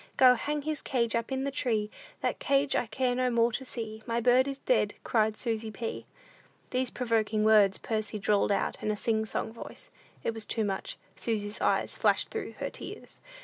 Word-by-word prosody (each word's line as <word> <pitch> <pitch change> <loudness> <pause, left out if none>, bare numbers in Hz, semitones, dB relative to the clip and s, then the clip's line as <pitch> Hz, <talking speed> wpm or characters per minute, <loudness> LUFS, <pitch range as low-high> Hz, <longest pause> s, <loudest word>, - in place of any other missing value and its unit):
Go 255 -1 +8
hang 295 +4 -2
his 310 -1 -2
cage 235 -4 0
up 230 +2 -1
in 265 0 -1
the 280 - -1
tree, 220 -5 0 0.3
That - - -1
cage 275 0 +2
I 245 - +1
care 250 +3 0
no 255 0 +1
more 235 0 +3
to 265 - -3
see. 220 -4 -6
My 230 0 0
bird 250 +3 +4
is 275 -1 -3
dead, - - +1
cried 220 -1 +1
Susy 225 -2 -1
P." 225 +2 -5 0.6
These 255 -1 0
provoking 225 -3 0
words 210 -3 +5
Percy 215 -1 -2
drawled 205 0 +2
out 200 - 0
in - - -1
a 215 - +1
sing 220 +1 0
song 220 - -2
voice. 230 - -10 0.3
It 230 - 0
was 220 -1 -3
too 220 -2 0
much. 195 -1 -3 0.2
Susy's 210 -1 -2
eyes - - +1
flashed - - +3
through - - -5
her - - -4
tears. - - -9
230 Hz, 195 wpm, -29 LUFS, 215-255 Hz, 0.6 s, Go